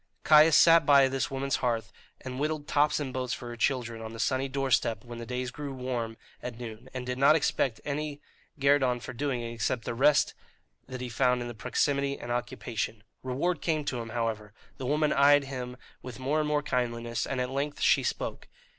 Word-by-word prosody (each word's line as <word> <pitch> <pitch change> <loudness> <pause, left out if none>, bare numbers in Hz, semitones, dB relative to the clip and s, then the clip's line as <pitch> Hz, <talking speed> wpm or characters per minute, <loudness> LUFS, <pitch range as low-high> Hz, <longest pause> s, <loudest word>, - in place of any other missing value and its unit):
Caius 155 0 +7
sat 165 -1 +7
by 140 -1 +6
this 135 0 -1
woman's 135 0 -1
hearth, 115 -2 -2 0.3
and 130 0 -6
whittled 150 0 -2
tops 150 +1 +2
and 135 -3 -4
boats 130 -1 -2
for 120 - -6
her 120 - -6
children 120 -2 -1
on 110 0 -7
the 115 - -9
sunny 130 +4 0
doorstep 130 -4 0
when 120 -1 -8
the 115 - -7
days 125 0 -3
grew 145 0 -6
warm 120 -3 -3 0.2
at 125 -2 -6
noon, 120 +1 -8
and 130 -1 -5
did 125 0 -3
not 140 +3 +6
expect 135 -5 0
any 145 0 -3 0.4
guerdon 135 -3 +3
for - - -8
doing 130 -1 -2
it 115 0 -5
except 115 +1 -2
the - - -2
rest 145 +5 +3 0.5
that 130 -1 -6
he 125 - -3
found 125 +1 +2
in 120 - -4
the 120 - -6
proximity 140 +6 0
and 120 - -7
occupation. 115 -1 -3 0.2
Reward 145 +7 -1
came 155 -3 0
to 125 -4 -2
him, 115 -1 -6
however. 110 -3 -3 0.2
The 130 - -5
woman 150 +2 +2
eyed 145 +1 +5
him 125 -2 -6 0.2
with 125 -2 -8
more 140 +4 0
and 155 - 0
more 150 -1 +1
kindliness, 120 -3 -2
and 135 - -2
at 125 0 -2
length 140 +2 -2
she - - +4
spoke. - - -3
130 Hz, 205 wpm, -29 LUFS, 120-140 Hz, 0.5 s, Caius